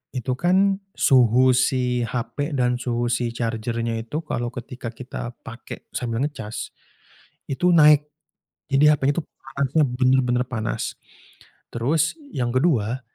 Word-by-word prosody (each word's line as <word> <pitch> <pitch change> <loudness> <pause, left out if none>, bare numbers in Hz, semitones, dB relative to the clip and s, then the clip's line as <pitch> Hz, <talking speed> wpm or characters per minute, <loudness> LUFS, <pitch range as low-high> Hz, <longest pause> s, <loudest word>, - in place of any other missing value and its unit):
itu 130 0 -2
kan 190 +2 +3 0.2
suhu 130 0 +5
si 125 -1 +1
HP 140 +6 -3
dan 125 -1 +1
suhu 120 -1 -1
si 120 -1 -1
charger-nya 115 0 -2
itu 150 +8 -5
kalau 120 -5 -3
ketika 125 -1 -7
kita 120 0 -7
pakai 120 +2 -9
sambil 120 +1 -2
ngecas 110 -8 -5 0.8
itu 175 +6 +2
naik, 150 -2 +6 0.6
jadi 150 +2 +5
HP-nya 140 +2 0
tuh 160 - -8
panasnya 140 +3 -1
bener-bener 125 -1 +2
panas. 110 -4 -3 0.8
Terus 150 +7 +1 0.2
yang 120 -2 -2
ke-2, 130 -4 +1
125 Hz, 125 wpm, -23 LUFS, 120-145 Hz, 0.8 s, naik